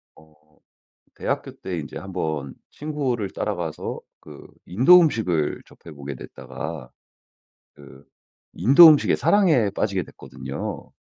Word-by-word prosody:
어 80 Hz, 0 st, -21 dB, 0.8 s
대학교 -, -, -4 dB
때 90 Hz, -3 st, -5 dB
인제 75 Hz, -, -8 dB
한번 80 Hz, -8 st, -4 dB, 0.2 s
친구를 135 Hz, -9 st, -3 dB
따라가서 -, -, -4 dB, 0.2 s
그 75 Hz, -2 st, -13 dB, 0.2 s
인도 130 Hz, -, +6 dB
음식을 90 Hz, -, 0 dB
접해 80 Hz, -, -15 dB
보게 70 Hz, -1 st, -7 dB
됐다가 75 Hz, +1 st, -9 dB, 0.8 s
그 70 Hz, -1 st, -16 dB, 0.5 s
인도 140 Hz, -, +8 dB
음식에 150 Hz, -2 st, +4 dB
사랑에 160 Hz, -, +3 dB
빠지게 100 Hz, -1 st, -2 dB
됐거든요. -, -, -8 dB
95 Hz, 245 characters per minute, -23 LUFS, -, 0.8 s, 인도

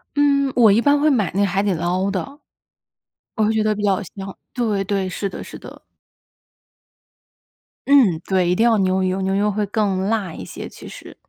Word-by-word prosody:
嗯， 280 Hz, -1 st, +2 dB
我 230 Hz, -4 st, +6 dB
一 220 Hz, +4 st, +3 dB
般 285 Hz, +2 st, +3 dB
会 305 Hz, +2 st, +3 dB
买 220 Hz, -, +1 dB
那 200 Hz, +2 st, +1 dB
海 195 Hz, 0 st, 0 dB
底 200 Hz, -1 st, 0 dB
捞 180 Hz, +3 st, -1 dB
的。 275 Hz, +9 st, -5 dB, 1.0 s
我 220 Hz, -, +1 dB
会 215 Hz, -, +2 dB
觉 220 Hz, -1 st, +1 dB
得 215 Hz, 0 st, +1 dB
比 210 Hz, -, -6 dB
较 200 Hz, 0 st, +1 dB
香， 195 Hz, -1 st, -8 dB, 0.2 s
对 215 Hz, -5 st, -1 dB
对， 195 Hz, -1 st, -2 dB
是 200 Hz, +2 st, -3 dB
的 -, -, -8 dB
是 -, -, -10 dB
的。 -, -, -13 dB, 2.1 s
嗯， 240 Hz, -, +5 dB
对， 185 Hz, -2 st, +1 dB
一 -, -, +3 dB
定 220 Hz, +6 st, +2 dB
要 225 Hz, -, +3 dB
牛 190 Hz, 0 st, +1 dB
油， 185 Hz, +1 st, -1 dB
牛 190 Hz, 0 st, -1 dB
油 205 Hz, +2 st, +1 dB
会 210 Hz, 0 st, -1 dB
更 200 Hz, -2 st, -1 dB
辣 200 Hz, -3 st, -1 dB
一 95 Hz, -, -8 dB
些 -, -, -8 dB
其 -, -, -12 dB
实。 -, -, -12 dB
200 Hz, 215 characters per minute, -20 LUFS, 190-225 Hz, 2.1 s, 我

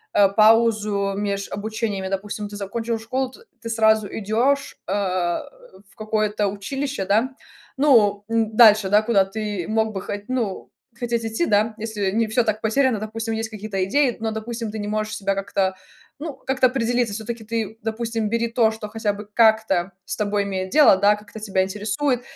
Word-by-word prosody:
э, 200 Hz, -1 st, +6 dB
паузу 215 Hz, -1 st, +3 dB
меж 200 Hz, -1 st, -2 dB
обучениями. 215 Hz, -2 st, -3 dB
Допустим, 205 Hz, +2 st, -4 dB
ты 205 Hz, -, -9 dB
закончил 225 Hz, +3 st, -3 dB
школу, 255 Hz, +3 st, -2 dB
т -, -, -16 dB, 0.2 s
ты -, -, -5 dB
сразу 220 Hz, -2 st, +3 dB
идешь, 235 Hz, +8 st, 0 dB
э, 190 Hz, -, -1 dB
в 195 Hz, -, -3 dB
какое-то 215 Hz, -1 st, 0 dB
училище, 270 Hz, +3 st, -4 dB
да. 225 Hz, +7 st, +1 dB, 0.4 s
Ну 215 Hz, -8 st, +4 dB
н 225 Hz, -1 st, 0 dB
дальше, 215 Hz, -4 st, +7 dB
да, 205 Hz, +2 st, +5 dB
куда 215 Hz, -3 st, +3 dB
ты 205 Hz, -3 st, -4 dB
мог 220 Hz, 0 st, +1 dB
бы 195 Hz, -3 st, -5 dB
хо -, -, -4 dB
ну, 235 Hz, -7 st, -3 dB, 0.3 s
хотеть 235 Hz, -1 st, -1 dB
идти, 225 Hz, +10 st, -1 dB
да, 215 Hz, +2 st, +2 dB
если 210 Hz, -3 st, -2 dB
не 225 Hz, +1 st, +1 dB
всё 230 Hz, +2 st, +2 dB
так 215 Hz, -1 st, -1 dB
потеряно. 230 Hz, 0 st, +2 dB
Допустим, 225 Hz, +1 st, -4 dB
есть 220 Hz, 0 st, -3 dB
какие-то 205 Hz, -3 st, -3 dB
идеи, 260 Hz, +4 st, +2 dB
но, 225 Hz, 0 st, -1 dB
допустим, 225 Hz, +1 st, -4 dB
ты 220 Hz, -, -6 dB
не 205 Hz, 0 st, -4 dB
можешь 215 Hz, 0 st, -2 dB
себя 195 Hz, -1 st, -1 dB
как-то 195 Hz, -1 st, -1 dB, 0.4 s
ну, 300 Hz, -2 st, -5 dB
как-то 265 Hz, -1 st, +1 dB
определиться. 245 Hz, -3 st, 0 dB
Всё-таки 225 Hz, +1 st, -5 dB
ты, 225 Hz, 0 st, -4 dB
допустим, 225 Hz, 0 st, -2 dB
бери 230 Hz, +1 st, 0 dB
то, 230 Hz, -1 st, +3 dB
что 220 Hz, -1 st, -7 dB
хотя 210 Hz, -1 st, -2 dB
бы 205 Hz, +1 st, -9 dB
как-то 220 Hz, -5 st, +3 dB
с -, -, -4 dB
тобой 205 Hz, -1 st, 0 dB
имеет 190 Hz, -1 st, -3 dB
дело, 300 Hz, -2 st, +6 dB
да, 205 Hz, +2 st, +4 dB
как-то 210 Hz, +1 st, -11 dB
тебя 195 Hz, -3 st, 0 dB
интересует. 210 Hz, +7 st, -1 dB
215 Hz, 175 wpm, -22 LUFS, 205-230 Hz, 0.4 s, дальше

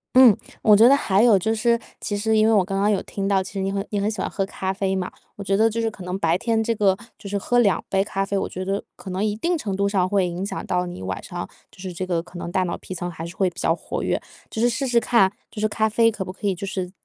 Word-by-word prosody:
嗯， 255 Hz, -5 st, +9 dB, 0.3 s
我 210 Hz, -2 st, +6 dB
觉 225 Hz, +4 st, +7 dB
得 -, -, +7 dB
还 200 Hz, -6 st, +2 dB
有 225 Hz, -5 st, +6 dB
就 220 Hz, +5 st, 0 dB
是 235 Hz, +1 st, +2 dB, 0.2 s
其 205 Hz, -, -2 dB
实 220 Hz, +2 st, +1 dB
因 215 Hz, -, +5 dB
为 225 Hz, -, +4 dB
我 200 Hz, -4 st, +4 dB
刚 195 Hz, +1 st, -3 dB
刚 205 Hz, +2 st, +3 dB
有 200 Hz, -, +1 dB
听 195 Hz, -1 st, -3 dB
到， 195 Hz, -1 st, +3 dB
其 190 Hz, -, -8 dB
实 195 Hz, -, -2 dB
你 195 Hz, 0 st, -1 dB
很 195 Hz, 0 st, -2 dB
你 205 Hz, -, 0 dB
很 205 Hz, +2 st, 0 dB
喜 215 Hz, -, -7 dB
欢 -, -, -1 dB
喝 195 Hz, -, -1 dB
咖 190 Hz, -1 st, -3 dB
啡 190 Hz, -1 st, -1 dB
嘛， 185 Hz, -1 st, -2 dB, 0.3 s
我 200 Hz, -, -6 dB
觉 195 Hz, 0 st, +1 dB
得 220 Hz, +3 st, +4 dB
就 225 Hz, +1 st, -3 dB
是 225 Hz, -1 st, +1 dB
可 210 Hz, -4 st, -11 dB
能 180 Hz, +2 st, -4 dB
白 165 Hz, -1 st, +2 dB
天 230 Hz, +2 st, 0 dB
这 230 Hz, +1 st, 0 dB
个 195 Hz, -3 st, +3 dB, 0.2 s
就 200 Hz, -, -9 dB
是 200 Hz, -, -1 dB
喝 245 Hz, +5 st, +1 dB
2 205 Hz, -5 st, +3 dB
杯 195 Hz, 0 st, +2 dB
咖 195 Hz, -1 st, -2 dB
啡， 200 Hz, 0 st, -1 dB
我 -, -, -2 dB
觉 185 Hz, +1 st, -5 dB
得 195 Hz, +1 st, -1 dB
可 190 Hz, -, -9 dB
能 185 Hz, +3 st, -1 dB
一 210 Hz, -1 st, 0 dB
定 345 Hz, +9 st, 0 dB
程 210 Hz, -10 st, -3 dB
度 200 Hz, +1 st, +1 dB
上 190 Hz, -3 st, +1 dB
会 195 Hz, -2 st, +2 dB
影 175 Hz, +2 st, -4 dB
响 -, -, -5 dB
到 180 Hz, 0 st, 0 dB
你 175 Hz, -, -7 dB
晚 95 Hz, 0 st, -4 dB
上 -, -, -5 dB, 0.2 s
就 -, -, -21 dB
是 185 Hz, -1 st, -6 dB
这 185 Hz, +2 st, -3 dB
个 175 Hz, -2 st, 0 dB
可 175 Hz, +1 st, -12 dB
能 170 Hz, 0 st, -5 dB
大 185 Hz, -, +1 dB
脑 175 Hz, -1 st, -3 dB
皮 -, -, -8 dB
层 175 Hz, 0 st, -4 dB
还 165 Hz, -1 st, -7 dB
是 170 Hz, +2 st, -9 dB
会 190 Hz, -2 st, +2 dB
比 175 Hz, -, -23 dB
较 165 Hz, -, +2 dB
活 -, -, -5 dB
跃。 -, -, 0 dB, 0.3 s
就 220 Hz, -, -4 dB
是 240 Hz, -, +5 dB
试 240 Hz, +3 st, -1 dB
试 240 Hz, -2 st, +3 dB
看， 230 Hz, -5 st, +3 dB, 0.2 s
就 210 Hz, -, -7 dB
是 215 Hz, -, +3 dB
咖 220 Hz, +1 st, +1 dB
啡 230 Hz, +1 st, +3 dB
可 200 Hz, -3 st, -5 dB
不 185 Hz, -, -7 dB
可 200 Hz, -, -9 dB
以 200 Hz, -, +2 dB
就 190 Hz, +2 st, -6 dB
是 185 Hz, -2 st, -3 dB
195 Hz, 340 characters per minute, -23 LUFS, 185-220 Hz, 0.3 s, 嗯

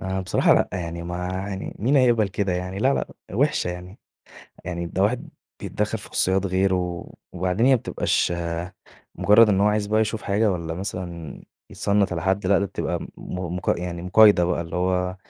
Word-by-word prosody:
آآ، 95 Hz, 0 st, -2 dB
بصراحة 90 Hz, -, +3 dB
لأ -, -, +2 dB
يعني 85 Hz, -2 st, -4 dB
ما 90 Hz, +1 st, -4 dB
يعني 95 Hz, +1 st, -5 dB
مين 130 Hz, +7 st, +2 dB
هيقبل 120 Hz, -5 st, +4 dB
كده 95 Hz, -1 st, -1 dB
يعني؟ 90 Hz, +2 st, -4 dB
لا 135 Hz, +5 st, +3 dB
لأ، -, -, -1 dB, 0.3 s
وحشة 135 Hz, -4 st, +1 dB
يعني، 90 Hz, +3 st, -9 dB, 0.7 s
يعني 85 Hz, -1 st, -4 dB
ده 95 Hz, +3 st, -1 dB
واحد 115 Hz, +5 st, 0 dB, 0.3 s
بيتدخل 105 Hz, +1 st, -2 dB
في -, -, -11 dB
خصوصيات 95 Hz, +1 st, +1 dB
غيره، 95 Hz, -2 st, -1 dB, 0.2 s
وبعدين 90 Hz, +6 st, 0 dB
هي 135 Hz, -, +6 dB
ما -, -, +2 dB
بتبقاش، 90 Hz, -, 0 dB
آآ، 85 Hz, +1 st, -4 dB, 0.4 s
مجرد 105 Hz, +2 st, +5 dB
إنه 100 Hz, 0 st, +3 dB
هو -, -, +5 dB
عايز 105 Hz, -1 st, 0 dB
بقى 110 Hz, +1 st, +2 dB
يشوف 110 Hz, 0 st, -1 dB
حاجة 105 Hz, +2 st, +1 dB
والّا 85 Hz, -2 st, -4 dB
مثلًا 85 Hz, -4 st, -6 dB, 0.3 s
يتصنّت 100 Hz, -2 st, +1 dB
على 80 Hz, -1 st, -3 dB
حد، 95 Hz, 0 st, 0 dB
لأ 100 Hz, 0 st, +4 dB
ده 100 Hz, -, 0 dB
بتبقى -, -, -3 dB
م -, -, -6 dB
م 90 Hz, -1 st, -5 dB
مق 90 Hz, -, 0 dB
يعني 85 Hz, -1 st, -5 dB
مقايضة 100 Hz, -1 st, +6 dB
بقى، 85 Hz, -1 st, 0 dB
اللي 85 Hz, +1 st, -5 dB
هو، 90 Hz, 0 st, 0 dB
95 Hz, 190 wpm, -23 LUFS, 90-105 Hz, 0.7 s, هي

